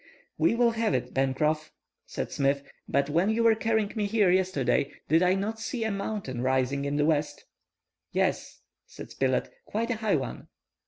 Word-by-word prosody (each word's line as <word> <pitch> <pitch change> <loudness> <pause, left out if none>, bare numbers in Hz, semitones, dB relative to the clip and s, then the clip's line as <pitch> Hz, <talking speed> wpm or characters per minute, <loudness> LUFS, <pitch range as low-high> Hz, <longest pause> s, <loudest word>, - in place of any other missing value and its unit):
"We - - +3
will 235 0 +4
have 225 - 0
it, 125 0 -3
Pencroff," 150 +4 0 0.4
said - - -4
Smith. 140 0 +1 0.3
"But 140 0 +2
when 170 +7 +2
you 225 +1 +1
were 230 -1 +6
carrying 220 -1 0
me 210 -2 0
here 205 -3 +3
yesterday, 180 -7 +1 0.2
did 160 +2 +4 0.2
not 215 +3 -2
I - - -14
see 225 +1 -3
a 220 - 0
mountain 195 - -3
rising 130 +2 +1
in 140 0 -1
the 145 - +2
west?" 150 -2 0 0.7
"Yes," - - -1 0.3
saidSpilett, - - -2 0.2
"quite 230 +3 -1
a 230 - -1
high 215 -2 +1
one." - - -4
175 Hz, 170 wpm, -28 LUFS, 140-220 Hz, 0.7 s, were